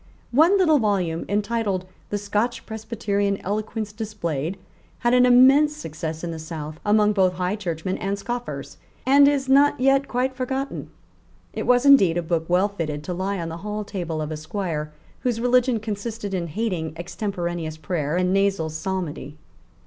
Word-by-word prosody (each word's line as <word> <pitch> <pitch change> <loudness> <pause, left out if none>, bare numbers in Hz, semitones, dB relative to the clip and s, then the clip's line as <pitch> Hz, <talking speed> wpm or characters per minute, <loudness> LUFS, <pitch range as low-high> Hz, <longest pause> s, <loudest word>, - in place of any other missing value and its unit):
One 320 +10 +5
little 315 -6 +4
volume, 185 -7 0
entitled 205 -2 -1 0.2
The 205 - -1
Scotch 210 +4 -1
Presbyterian 210 -3 -2
Eloquence 215 +1 -3
Displayed, 190 -7 -3 0.4
had 240 0 +2
an 250 0 +6
immense 270 +5 +6
success 160 - -5
in 170 - -3
the 165 - -6
South 155 -1 -7
among 210 0 +3
both 190 -2 +3
High 180 +2 -1
Churchmen 185 -2 -3
and 200 +1 -2
scoffers, 240 +4 -5 0.3
and 280 +2 +6
is 280 -2 +1
not 280 +1 +4
yet 270 +1 +3
quite 255 +1 0
forgotten. 265 +2 -3 0.6
It - - -4
was 250 +1 +4
indeed 195 -12 +6
a 175 - 0
book 165 -1 -1
well 180 +3 +3
fitted 155 -7 -4
to 180 - -4
lie 190 +3 -2
on 165 -1 -3
the 165 - -6
hall 210 +3 -4
table 170 -6 -4
of 150 - -5
a 155 - -3
Squire 155 -2 -4 0.3
whose 240 -3 -1
religion 245 0 +3
consisted 210 -1 -5
in 175 -2 -1
hating 170 -3 -2
extemporaneous 175 -3 -4
prayer 155 0 -2
and 180 0 +1
nasal 195 -5 +1
psalmody. 155 -4 -4
200 Hz, 165 wpm, -23 LUFS, 170-240 Hz, 0.6 s, an